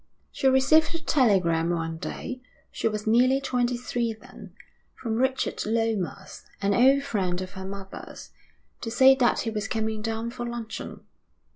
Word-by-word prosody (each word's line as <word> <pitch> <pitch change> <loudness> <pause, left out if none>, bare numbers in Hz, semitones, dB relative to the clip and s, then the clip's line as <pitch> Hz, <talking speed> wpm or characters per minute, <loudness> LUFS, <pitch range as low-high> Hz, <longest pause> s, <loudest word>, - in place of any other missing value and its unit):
She 270 - 0
received 305 +5 +4
a - - -2
telegram 190 - +2
one 165 -1 -2
day 255 +7 -6 0.3
she - - -1
was 210 -1 -3
nearly 250 +4 +4
twenty 250 -2 0
three 240 -1 -2
then 220 - -13 0.4
from 230 -3 -4
Richard 260 +3 0
Lomas, 215 -4 -2 0.2
an 200 0 +1
old 270 +5 +5
friend 190 -9 -1
of 185 -1 -6
her 190 -1 -8
mother's, 195 0 -9 0.5
to 230 - -4
say 265 +3 +6
that 255 -2 +2
he 225 - -2
was 210 -2 -3
coming 220 -1 -2
down 225 +1 -3
for 240 0 -6
luncheon. 235 -2 -6
225 Hz, 155 wpm, -26 LUFS, 200-255 Hz, 0.5 s, say